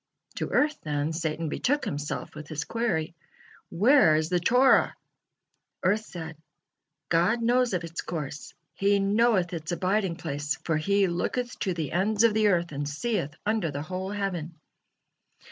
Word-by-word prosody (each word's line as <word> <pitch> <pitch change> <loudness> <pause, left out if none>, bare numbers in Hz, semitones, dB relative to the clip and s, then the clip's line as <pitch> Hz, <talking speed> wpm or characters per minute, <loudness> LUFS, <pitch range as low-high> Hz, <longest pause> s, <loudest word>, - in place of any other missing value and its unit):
To - - -2
earth, 300 0 +2
then, 150 +1 -2
Satan 160 0 -2
betook 285 - 0
himself 145 +1 -4
with 155 - -9
his 150 -2 -3
query: 220 -9 -1 0.6
"Where 210 - +5
is 155 +1 0
the 180 - +2
Torah?" 250 +9 +4 0.9
Earth 210 +4 +2
said: 160 -4 -8 0.7
"God 180 +8 +2
knows 245 -2 +2
of 175 - -2
its 165 0 -5
course, 150 -3 -6 0.2
He 200 +1 +2
knoweth 200 -2 +2
its 160 -1 -4
abiding 185 +1 0
place, 145 -3 -3
for 160 - 0
'He 200 +5 +2
looketh 240 +8 -2
to 185 -3 -1
the 160 -4 -3
ends 205 +5 +2
of 230 -2 +5
the 215 0 +3
earth, 175 -4 +1
and 145 0 -3
seeth 160 -1 -2
under 215 -5 +1
the 145 0 -4
whole 185 +3 -4
heaven.'" 185 -5 -3
175 Hz, 155 wpm, -27 LUFS, 160-215 Hz, 0.9 s, Where